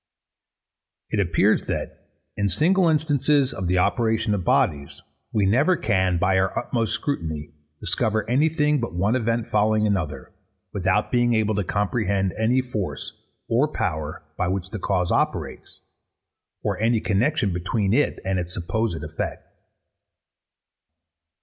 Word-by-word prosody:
It 105 - 0
appears 85 -6 +2
that, - - -5 0.3
in 100 -1 0
single 175 - +3
instances 145 -3 +2
of 95 -1 -4
the 90 +1 +2
operation 110 +2 +1
of 100 -3 -1
bodies, 70 -4 +1 0.3
we 105 -3 +1
never 140 - +3
can, 95 -4 +1
by 95 +1 +2
our 95 0 0
utmost 115 -3 -1
scrutiny, 80 - -3 0.3
discover 110 -1 -1
any 140 +7 +3
thing 150 -2 +1
but 115 -7 -4
one 100 +7 +1
event 115 -2 0
following 110 0 +2
another, 80 -10 -2 0.4
without 95 +1 +1
being 120 -1 +3
able 110 -1 +1
to 105 0 0
comprehend 100 -1 0
any 120 +4 +2
force 110 -7 -4 0.3
or 125 +6 +2
power 80 - -3 0.2
by 90 - +1
which 95 +1 -3
the 110 - -4
cause 90 -1 0
operates, - - -2 0.8
or - - -1
any 115 +1 +2
connexion 110 - +1
between 95 +3 0
it 145 +4 +2
and 95 -1 0
its 90 0 -5
supposed 85 -1 -2
effect. 75 +1 -5
105 Hz, 135 wpm, -24 LUFS, 90-120 Hz, 0.8 s, single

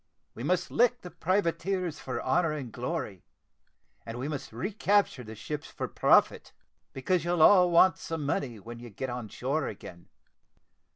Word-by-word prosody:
We - - -9
must 180 +6 0
lick 245 +1 +2
the 180 - -9
privateers 180 -1 -1
for 130 - -4
honour 160 +4 +1
and 135 -6 -6
glory, 125 - -4 0.8
and 115 +1 -7
we 130 +3 -3
must 150 -3 -5
re 125 - -4
capture 200 -9 +1
the 110 0 -9
ships 150 +8 -6
for - - -5
profit, - - +3 0.4
because 160 +7 0
you'll 175 -2 +2
all 180 -2 +7
want 175 +2 +5
some 160 -3 -4
money 125 -5 -2
when 115 +3 -9
you 120 0 -10
get 125 +5 -5
on 120 -2 -5
shore 140 +6 -2
again. 85 -4 -10
150 Hz, 165 wpm, -29 LUFS, 120-180 Hz, 0.8 s, all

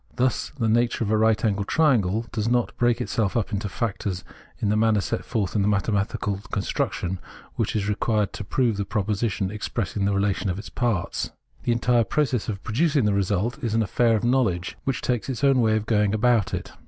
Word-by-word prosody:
Thus, 125 0 0
the 115 -4 0
nature 120 +1 +2
of 105 - -1
a 110 - +3
right 110 0 +3
angled 100 -2 0
triangle 115 - +2
does 110 -2 -2
not 120 -1 +1
break 120 0 +2
itself 115 -3 0
up 110 -1 -1
into 100 0 -2
factors 100 -4 -3 0.4
in 105 - 0
the 105 - +2
manner 110 -1 +3
set 95 - -2
forth 105 -3 -2
in 105 - +3
the 100 - +2
mathematical 100 -1 0
construction 95 -2 -2 0.4
which 110 - -1
is 100 -2 0
required 105 0 0
to - - -5
prove 115 +1 0
the 100 - 0
proposition 105 -1 -1
expressing 105 -1 -2
the 100 - +1
relation 100 0 0
of 90 - -2
its 105 - -7
parts. 115 -7 -1 0.4
The 120 - +2
entire 120 0 +3
process 125 +1 0
of 100 -2 -4
producing 140 +2 +1
the 105 - +2
result 100 +7 0
is 115 -2 0
an 115 - +3
affair 115 +3 +2
of 110 - -1
knowledge 120 -8 +1
which 135 - -1
takes 125 0 -1
its 130 +1 -4
own 135 -2 +5
way 110 -1 +3
of 110 -1 -1
going 105 -2 +2
about 115 -2 +2
it. - - -6
110 Hz, 205 wpm, -24 LUFS, 100-120 Hz, 0.4 s, own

